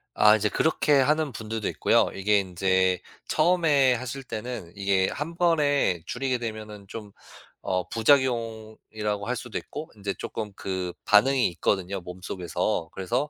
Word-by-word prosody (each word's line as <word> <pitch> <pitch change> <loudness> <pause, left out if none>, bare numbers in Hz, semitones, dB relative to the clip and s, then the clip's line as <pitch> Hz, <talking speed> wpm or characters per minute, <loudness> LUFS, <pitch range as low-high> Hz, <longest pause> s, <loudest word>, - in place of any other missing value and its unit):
아 105 0 +6
이제 110 0 +1
그렇게 150 +2 +2
하는 150 +1 +2
분들도 110 -1 -4
있고요. - - +2
이게 100 +1 +2
인제 95 0 +1 0.3
처음에 155 -7 +3
하실 130 +3 -5
때는 115 -6 -6
이게 100 -1 +1
1 155 +5 -5
번에 145 - +2
줄이게 130 0 -1
되면은 110 -3 -7
좀 105 0 -8 0.5
어 90 -1 -1
부작용이라고 110 -4 0
할 125 +3 -2
수도 125 - -5
있고 155 +3 -7
인제 100 -2 -4
쪼끔 105 -2 -5
그 95 -2 -3
반응이 125 +5 +4
있거든요 95 +2 -1
몸속에서. 90 -2 -3
그래서 120 +10 -2
110 Hz, 300 characters per minute, -26 LUFS, 95-130 Hz, 0.5 s, 아